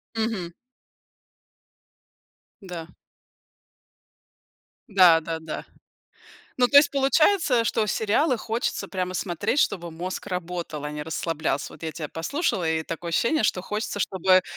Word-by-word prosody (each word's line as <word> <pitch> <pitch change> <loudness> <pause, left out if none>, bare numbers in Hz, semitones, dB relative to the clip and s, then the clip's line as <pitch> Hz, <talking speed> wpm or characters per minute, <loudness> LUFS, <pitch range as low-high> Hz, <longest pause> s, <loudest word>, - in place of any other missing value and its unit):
Мгм. 220 -6 -2 2.1
Да. 175 -3 -7 2.0
Да 180 -5 +6
да 165 0 -4
да. 160 -1 -6 0.9
Ну, 245 - +5
то 280 - +6
есть 290 - +7
получается, 275 - +3
что 220 0 +1
сериалы 225 +7 +1
хочется 225 +2 -2
прямо 185 -1 -3
смотреть, 185 - -1
чтобы 175 -8 0
мозг 180 +3 -5
работал, 175 -5 -4
а 150 - -4
не 150 0 -5
расслаблялся. 160 -2 -2
Вот - - -13
я 160 - -3
тебя 155 -1 -5
послушала, 180 - -1
и 160 0 +1
такое 165 +1 -5
ощущение, 235 - +2
что 185 -3 +1
хочется, 210 +1 -3
чтобы 185 -1 +3
185 Hz, 125 wpm, -25 LUFS, 165-225 Hz, 2.1 s, есть